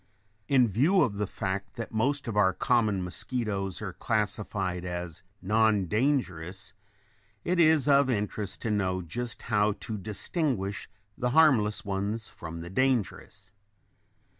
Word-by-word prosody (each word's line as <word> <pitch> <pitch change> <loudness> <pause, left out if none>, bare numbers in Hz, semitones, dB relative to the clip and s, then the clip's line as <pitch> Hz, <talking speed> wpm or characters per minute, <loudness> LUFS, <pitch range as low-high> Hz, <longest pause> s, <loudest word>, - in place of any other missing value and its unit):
] 105 +1 -42
In 125 -2 +6
view 150 - +3
of 105 -7 -1
the 105 -1 -1
fact 95 +1 -4
that 115 -2 -6
most 135 +5 0
of 115 - -3
our 100 -3 +4
common 110 -6 +1
mosquitoes 100 0 -2
are 95 -4 -4
classed 105 +1 -1
as 90 -3 -4 0.2
non 105 0 +3
dangerous, 100 - -1 0.7
it 180 0 0
is 155 -4 +5
of 140 -1 +5
interest 105 -4 -2
to 110 - -1
know 95 -3 0
just 115 +7 -5
how 105 -2 +2
to 110 +1 -5
distinguish 105 - -2 0.3
the 125 -2 -1
harmless 110 -9 +4
ones 100 +3 -2
from 85 0 -8
the 85 - -7
dangerous. 105 -4 -1
105 Hz, 140 wpm, -28 LUFS, 95-120 Hz, 0.7 s, In